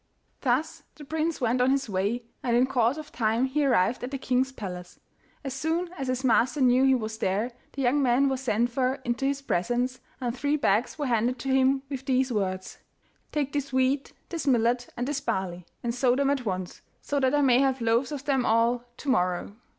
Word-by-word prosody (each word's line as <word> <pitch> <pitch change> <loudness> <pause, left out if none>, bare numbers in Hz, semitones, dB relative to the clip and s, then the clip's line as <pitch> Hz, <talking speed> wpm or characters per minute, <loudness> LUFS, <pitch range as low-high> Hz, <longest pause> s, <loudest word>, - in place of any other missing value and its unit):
Thus 260 +4 0
the 295 - -11
prince 320 +2 -1
went 250 -1 +1
on 250 - +4
his 275 -1 +1
way, 205 +5 -1 0.2
and 240 -1 +1
in 250 - +5
course 255 0 +1
of 310 -1 -8
time 225 +2 +1
he 285 +3 0
arrived 245 -4 +2
at 250 - -3
the 275 - -3
king's 260 0 0
palace. 180 -7 -8 0.4
As 270 -2 -4
soon 325 +6 -1
as 270 -4 -4
his 255 +1 -1
master 260 +3 +3
knew 255 0 +4
he 265 -1 +5
was 220 -2 -4
there, 205 +6 0 0.2
the 275 - -3
young 265 +4 +3
man 260 +1 +3
was 265 -1 -1
sent 240 -1 +1
for 255 +1 +1
into 240 +3 0
his 280 0 -2
presence, 245 +5 -1 0.2
and 245 -2 -2
three 285 +3 0
bags 240 -3 +1
were 295 - -2
handed 240 0 +1
to 270 +3 -5
him 265 0 +3
with 270 -1 -6
these 260 0 +2
words: 185 -3 -3 0.5
'Take 285 -2 -1
this 285 -2 -2
wheat, 260 +2 +1 0.2
this 330 -5 -4
millet, 240 -1 +2
and 245 +1 -2
this 285 -1 -2
barley, 190 -8 -3 0.2
and 235 -1 -1
sow 250 0 +2
them 280 +1 +2
at 265 -5 -2
once, 185 -2 -4 0.2
so 285 - -1
that 265 +1 +2
I 290 - +3
may 255 -3 +5
have 265 -1 +2
loaves 230 +4 +1
of 285 -1 -5
them 270 -3 +2
all 235 +1 +2
to - - -10
morrow. 180 -4 0
255 Hz, 210 wpm, -27 LUFS, 235-275 Hz, 0.5 s, in